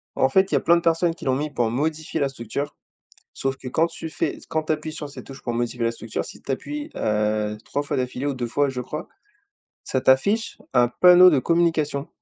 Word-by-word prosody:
En 130 - +3
fait 190 +6 +3
il - - +3
y - - +5
a - - 0
plein 170 - +5
de 170 - +1
personnes 165 0 +2
qui - - -11
l'ont 130 -1 +2
mis 150 +3 -2
pour 120 -5 0
modifier 155 +6 -2
la 140 - +1
structure. 135 +3 -5 0.6
Sauf 135 0 -2
que 130 - -8
quand 160 +6 +2
tu 165 - -7
fais 155 - -2
s - - -15
quand 155 -1 -1
tu 155 - 0
appuies 155 0 -4
sur 150 -1 -6
cette 140 - -10
touche 135 0 -11
pour 120 - -2
modifier 120 0 -1
la 115 - +1
structure, 115 -1 -4
si - - -12
tu - - -8
appuies, 295 - -5
heu, 105 0 0
3 145 - -2
fois 145 0 -3
d'affilée 125 +1 -2
ou 140 - 0
2 125 -2 -3
fois 140 +4 +1
je 130 -2 -4
crois, 150 +5 -6 0.8
ça 130 - -1
t'affiche 200 - +2 0.2
un 120 -1 +5
panneau 180 +7 +7
de 150 -6 +3
communication. 160 -2 +1
140 Hz, 240 wpm, -23 LUFS, 125-160 Hz, 0.8 s, panneau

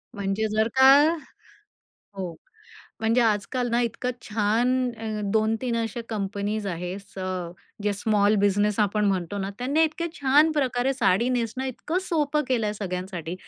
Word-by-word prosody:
म्हणजे 200 +2 -1
जर 220 +1 +3
का 265 0 +7 1.3
हो, 185 -3 -4 0.7
म्हणजे 225 +2 +2
आजकाल 230 +3 0
ना 235 +1 +2
इतकं 240 +2 -2
छान 220 +3 +1 0.3
अं 215 -2 -3
2-3 225 +2 +1
अशा 230 0 -2
कंपनीज 205 0 -2
आहेत. 180 +1 -4
स 195 -1 -15 0.6
ज्या 205 0 +1
स्मॉल 205 0 +2
बिझनेस 205 +1 +2
आपण 210 +1 +1
म्हणतो 190 0 -1
ना, 195 0 -3
त्यांनी 275 +6 +1
इतके 330 +2 -2
छान 290 +3 +4
प्रकारे 265 -3 +1
साडी 235 -2 +2
नेसणं 245 0 -1
इतकं 305 +7 -2
सोपं 300 -4 0
केलंय 225 -5 +1
सगळ्यांसाठी. 180 -4 -5
220 Hz, 140 wpm, -25 LUFS, 200-250 Hz, 1.3 s, का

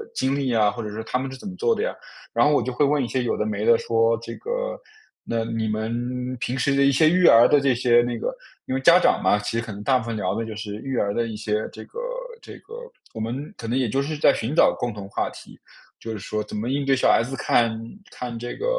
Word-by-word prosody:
经 135 +1 0
历 135 -3 -1
啊， 105 -2 +3
或 120 - -6
者 105 - -5
说 110 +2 -5
他 125 - -2
们 130 +1 -4
是 135 - -8
怎 165 - -9
么 185 - -6
做 460 - +2
的 435 - -2
呀。 - - -1 0.4
然 - - +4
后 150 - +4
我 - - +2
就 130 - -3
会 135 - +1
问 145 0 +2
一 - - -2
些 130 +1 -1
有 120 - -1
的 105 - -1
没 105 0 -2
的， 115 - +6
说， 115 0 +2
这 115 - -8
个， - - -3 0.5
“那 115 -1 -1
你 115 -1 -2
们 120 +4 -3
平 125 +2 -2
时 140 +2 +1
的 140 - +3
一 140 - +5
些 155 +4 +4
育 180 +2 +3
儿 115 +1 +8
的 145 - +4
这 140 -2 +2
些 120 0 +4
那 120 0 -2
个” - - -3 0.3
因 - - -3
为 - - 0
家 170 +5 +7
长 - - +3
嘛， - - +3
其 105 - -4
实 115 - -1
很 105 -3 -7
大 130 +3 +3
部 110 - -7
分 115 -1 -3
聊 95 -3 -1
的 115 - -2
就 110 -1 -7
是 105 -1 -6
育 135 +4 -4
儿 100 - +1
的 115 +1 0
一 110 - -6
些 105 0 -2
这 - - -9
个 480 - -9 0.4
这 - - -11
个 460 - -15 0.4
我 - - -5
们 125 - -4
可 115 - -7
能 120 +3 0
也 130 -2 +1
就 135 - 0
是 150 +3 -3
在 145 - +5
寻 115 +6 -3
找 - - +5
共 120 - -1
同 100 -2 -8
话 - - -1
题， - - -14 0.4
就 115 - -6
是 110 - -4
说 105 +2 -3
怎 - - -9
么 110 +3 -3
应 140 +2 0
对 135 0 +3
小 130 - +3
孩 - - +4
子 135 +3 -5
看 115 -3 +1 0.3
看 120 -2 -6
这 120 +1 -5
个 - - -5
120 Hz, 305 characters per minute, -23 LUFS, 110-135 Hz, 0.5 s, 儿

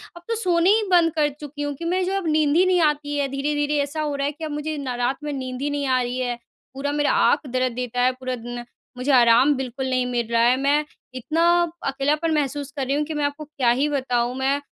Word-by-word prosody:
अब 345 - -11
तो 460 - -1
सोने 360 -5 +2
ही - - -2
बंद 340 -2 +5
कर 305 -2 +2
चुकी 295 0 -8
हूँ 290 0 -2
कि 335 - -7
मैं 365 +2 +1
जो 380 - -2
अब 380 -4 -3
नींद 305 -1 +2
ही 360 +3 +5
नहीं 370 -1 +3
आती 295 -1 0
है 285 -1 +1
धीरे-धीरे 290 +2 -1
ऐसा 290 +2 -4
हो 295 -2 -2
रहा 280 0 -1
है - - -1
कि 315 +2 -11
अब 310 - -5
मुझे 300 +1 -3
ना 265 -3 -4
रात 265 +2 0
में 295 - -3
नींद 260 -1 -5
ही 290 - -1
नहीं 285 -1 -2
आ 255 -1 +2
रही 245 +1 -3
है। 245 -1 -1 0.4
पूरा 275 +2 -3
मेरा 290 0 +1 0.2
आँख 295 - -1
दर्द 255 -1 -1
देता 250 0 -2
है 250 +1 +4
पूरा 255 0 -4
दिन, 240 0 -7 0.3
मुझे 255 +3 0
आराम 245 +2 +5
बिल्कुल 260 0 -4
नहीं 255 -1 +1
मिल 240 -2 -2
रहा 230 0 +3
है 245 +2 +4
मैं 290 +2 +2 0.3
इतना 310 +6 -1 0.4
अकेलापन 295 +4 0
महसूस 290 -1 -2
कर 270 - -1
रही 275 +2 0
हूँ 295 - +1
कि 315 - -5
मैं 295 -1 -2
आपको 290 +2 -4
क्या 280 -5 0
ही 290 - +2
बताऊँ, 250 -3 -1
मैं 270 +2 +1
285 Hz, 255 wpm, -23 LUFS, 255-300 Hz, 0.4 s, बंद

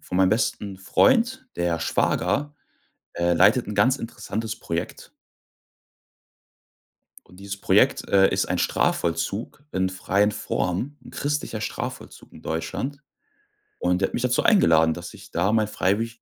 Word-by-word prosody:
von 90 - -5
meinem 95 0 +4
besten 105 -3 -1
Freund, 255 - +2
der 85 -1 0
Schwager 145 - 0 0.6
äh, 85 0 +1
leitet 105 +8 +4
'n 105 - -4
ganz 125 +7 +3
interessantes 115 -1 -5
Projekt. 85 +1 -5 2.2
Und 90 - -18
dieses 100 0 -7
Projekt, - - +3
äh, 95 -1 +5
ist - - 0
ein - - -1
Strafvollzug 100 - -1
in 95 0 +1
freien 95 +2 +1
Formen, 105 +9 -2
'n - - -11
christlicher 145 -6 -3
Strafvollzug 110 - -6
in - - -13
Deutschland, 80 - -4 0.8
und 90 +1 +1
der 95 - +2
hat - - -18
mich 120 - -1
dazu 125 -1 +1
eingeladen, 80 - +5
dass 85 +1 -8
ich - - -14
da 95 +5 +1
mein 110 -2 +2
freiwillig 115 +4 -1
100 Hz, 140 wpm, -24 LUFS, 90-120 Hz, 2.2 s, äh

